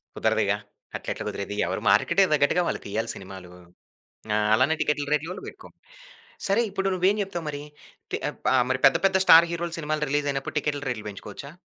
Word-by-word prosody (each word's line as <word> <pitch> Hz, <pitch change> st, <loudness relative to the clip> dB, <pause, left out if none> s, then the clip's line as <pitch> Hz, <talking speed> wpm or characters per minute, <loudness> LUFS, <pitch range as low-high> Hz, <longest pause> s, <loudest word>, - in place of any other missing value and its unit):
కుదరదుగా! -, -, +1 dB, 0.4 s
అట్లెట్లా -, -, -5 dB
కుదిరేది? 100 Hz, +1 st, -4 dB
ఎవరు -, -, -3 dB
మార్కెట్‌కి 195 Hz, -, +4 dB
దగ్గట్టుగా 150 Hz, +4 st, +3 dB
వాళ్ళు -, -, -2 dB
తీయాలి 110 Hz, +3 st, -3 dB
సినిమాలు. 95 Hz, -2 st, -10 dB, 0.8 s
ఆ! 105 Hz, -, +2 dB, 0.2 s
అలానే 130 Hz, +7 st, +3 dB
టికెట్ల 145 Hz, -1 st, 0 dB
రేట్లు 160 Hz, +4 st, -2 dB
బెట్టుకో. -, -, -11 dB, 0.8 s
సరే 200 Hz, +4 st, +3 dB
ఇప్పుడు 195 Hz, 0 st, -2 dB
నువ్వేం 185 Hz, +3 st, +2 dB
జెప్తావు 175 Hz, -4 st, -4 dB
మరి? 145 Hz, -1 st, -5 dB, 0.5 s
తి -, -, 0 dB
ఆహ్, -, -, -5 dB
బ -, -, +1 dB, 0.2 s
మరి 130 Hz, -, 0 dB
పెద్ద 135 Hz, -, +6 dB
పెద్ద 190 Hz, 0 st, +4 dB
స్టార్ 165 Hz, 0 st, +8 dB
హీరోల 170 Hz, 0 st, -3 dB
సినిమాలు 155 Hz, -1 st, -1 dB
రిలీజ్ 145 Hz, 0 st, 0 dB
అయినప్పుడు 135 Hz, +2 st, -5 dB
టికెట్ల 145 Hz, 0 st, -2 dB
రేట్లు 110 Hz, -4 st, -4 dB
బెంచుకోవచ్చా? 105 Hz, +7 st, -9 dB
150 Hz, 170 wpm, -25 LUFS, 125-170 Hz, 0.8 s, స్టార్